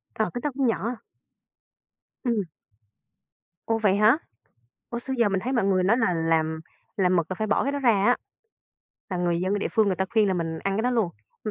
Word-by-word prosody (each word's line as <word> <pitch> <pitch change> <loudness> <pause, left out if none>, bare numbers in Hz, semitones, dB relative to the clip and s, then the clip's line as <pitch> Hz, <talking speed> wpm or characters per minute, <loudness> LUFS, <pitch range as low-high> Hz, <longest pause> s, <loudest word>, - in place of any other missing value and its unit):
Ờ, 220 -4 0
cái 245 - -4
đó 295 - +1
cũng 265 -3 +2
nhỏ. 230 +2 -1 1.3
Ừm. 230 -4 +1 1.2
Ô, 225 0 +2
vậy 200 -3 +3
hả? 215 +7 +5 0.7
Ủa, 235 - -3
xưa 265 +2 -4
giờ 230 -3 +4
mình 190 -1 0
thấy 255 +5 -3
mọi 235 -6 +2
người 190 -2 +2
nói 220 +5 +4
là 225 -7 +2
làm 160 -1 0 0.4
làm 185 -2 +3
mực 170 -1 +1
là 185 - -1
phải 215 +3 -2
bỏ 210 - +2
cái 280 - -1
đó 285 - -2
ra 250 -4 +4
á. 215 +4 +3 0.9
Là 180 - -2
người 175 -1 0
dân 190 +3 0
địa - - -2
phương 220 -3 +3
người 190 -3 +1
ta 190 - 0
khuyên 215 -3 +3
là 190 - +1
mình 165 -2 -2
ăn 195 +3 -2
cái 220 - 0
đó 250 - +1
luôn. 225 -7 +1 0.4
Mà 215 - -1
205 Hz, 225 wpm, -25 LUFS, 185-235 Hz, 1.3 s, hả